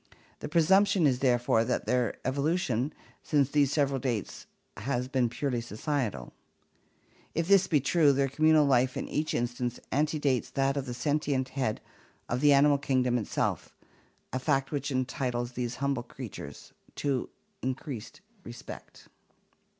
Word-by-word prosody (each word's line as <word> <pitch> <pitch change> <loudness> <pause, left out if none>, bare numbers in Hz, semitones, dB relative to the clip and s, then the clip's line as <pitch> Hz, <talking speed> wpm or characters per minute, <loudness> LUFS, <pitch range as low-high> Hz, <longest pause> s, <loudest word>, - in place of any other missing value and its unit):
The - - -6
presump 190 +6 +5
tion 180 -6 +2
is 130 -3 +2
therefore 120 -3 +2
that 125 - -1
their 125 -2 0
evolution 140 -2 0 0.3
since 140 -3 +1
these 145 -2 +3
several 140 -3 +1
dates 120 -5 -3 0.3
has 125 +2 -2
been 130 -3 +1
purely 125 -1 -2
societal. 115 - -3 1.0
If 165 0 0
this 195 -1 +5
be 155 -4 +3
true, 145 +2 +4
their 135 0 +2
communal 155 +2 +4
life 130 -1 +2
in - - -3
each 155 +1 -1
instance 120 0 -2
antedates 145 -3 +1
that 135 0 0
of 140 -2 -3
the 120 - -4
sentient 140 -1 0
head 130 -5 -2 0.5
of 125 +2 -2
the 145 -1 +6
animal 140 0 +5
kingdom 125 -3 +1
itself, 105 - -2 0.6
a 130 - 0
fact 135 0 0
which 145 -1 -2
entitles 125 -2 -2
these 120 -1 -3
humble 140 -1 -1
creatures 120 -2 -9 0.2
to 140 -4 -1 0.3
increased 130 - -5 0.2
respect. 120 - -10
135 Hz, 140 wpm, -29 LUFS, 125-145 Hz, 1.0 s, the